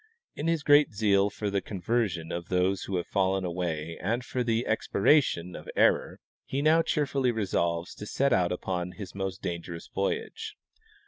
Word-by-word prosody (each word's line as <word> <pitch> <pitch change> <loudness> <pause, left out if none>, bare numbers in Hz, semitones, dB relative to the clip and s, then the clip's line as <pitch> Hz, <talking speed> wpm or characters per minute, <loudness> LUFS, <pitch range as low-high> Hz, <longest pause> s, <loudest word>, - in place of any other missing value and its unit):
In 150 - -4
his 165 -3 +1
great 145 -3 +5
zeal 100 -1 +3
for 105 0 -3
the 100 -1 0
conversion 95 -3 -1
of 85 0 -5
those 95 +1 +1
who 100 - -3
have 85 - -2
fallen 95 -1 +1
away 85 -2 -3
and 115 +7 -1
for 125 0 -1
the 115 0 0
expiration 100 - +2
of - - -9
error, - - +3 0.2
he 140 +2 -2
now 160 +2 +5
cheerfully 140 -5 +1
resolves 85 -6 -1
to 105 - -8
set 140 +5 +2
out 90 -1 +2
upon 90 0 -3
his 100 -3 -8
most 95 -1 -4
dangerous 85 -1 -5
voyage. 430 - -3
100 Hz, 170 wpm, -28 LUFS, 90-125 Hz, 0.2 s, great